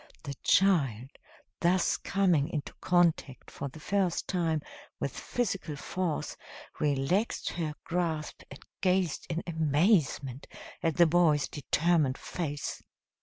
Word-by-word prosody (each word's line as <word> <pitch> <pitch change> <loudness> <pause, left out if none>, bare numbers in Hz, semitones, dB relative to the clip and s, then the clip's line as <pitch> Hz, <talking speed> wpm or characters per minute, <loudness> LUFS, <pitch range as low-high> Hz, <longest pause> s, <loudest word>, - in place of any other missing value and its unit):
The 140 -3 -4
child, 135 - +3 0.5
thus 180 +1 +3
coming 180 -7 +2
into 150 -3 -4
contact 170 -7 +1
for - - -5
the 150 +4 -10
first 190 +1 0
time 165 -5 0 0.4
with - - -3
physical 195 -10 -2
force, 170 +2 -3 0.4
relaxed 150 +9 0
her 155 -3 -3
grasp 165 -3 -2
and - - -12 0.2
gazed 185 -4 +1
in 165 +1 -2
amazement 155 - +1 0.3
at 165 -3 0
the 175 - +7
boy's 160 -4 +3
determined 150 -1 +1
face. 145 -5 -4
165 Hz, 115 wpm, -30 LUFS, 145-180 Hz, 0.5 s, the